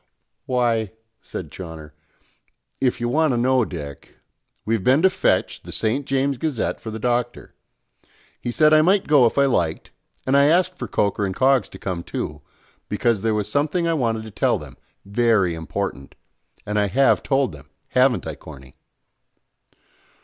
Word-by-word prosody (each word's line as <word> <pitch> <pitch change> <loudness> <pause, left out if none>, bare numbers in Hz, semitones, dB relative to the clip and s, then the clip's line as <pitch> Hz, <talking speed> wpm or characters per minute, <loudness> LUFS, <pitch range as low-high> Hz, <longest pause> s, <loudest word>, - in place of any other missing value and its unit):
"Why," 115 -5 0 0.3
said - - -7
Chawner, 80 -4 -9 0.9
"if 125 -3 0
you 120 - -1
want 150 +3 +2
to - - 0
know, 130 +1 +3
Dick, 75 -8 -8 0.5
we've 110 -3 0
been 135 - +4
to 190 - +6
fetch 185 - 0
the - - -10
St. 125 +6 -1
James' 135 -1 0
Gazette 150 -7 -2
for 110 - -7
the 110 - -5
Doctor. 120 +1 -2 0.9
He 120 - -4
said 155 +6 +4
I 155 - +7
might 190 +4 +3
go 145 -5 +5
if 115 - -4
I 140 - +5
liked, 85 -12 -1 0.3
and 130 - +2
I 140 0 +6
asked 180 +4 +3
for - - -6
Coker 100 0 0
and 95 -2 -2
Coggs 130 -4 +3
to - - -11
come 90 -3 -4
too; - - -5 0.5
because 115 -4 +1
there 110 0 +1
was 105 -2 -1
something 150 +8 0
I 165 - +2
wanted 115 -7 -1
to 110 - -10
tell - - +1
them, - - -11 0.3
very 100 -3 +2
important, 80 -4 -5 0.5
and 105 0 -1
I 105 - +2
have 135 +8 +3
told 135 -2 +1
them, - - -14 0.2
haven't 125 -1 +2
I, 80 - -4
Corny?" 70 -2 -13
120 Hz, 170 wpm, -22 LUFS, 100-140 Hz, 0.9 s, I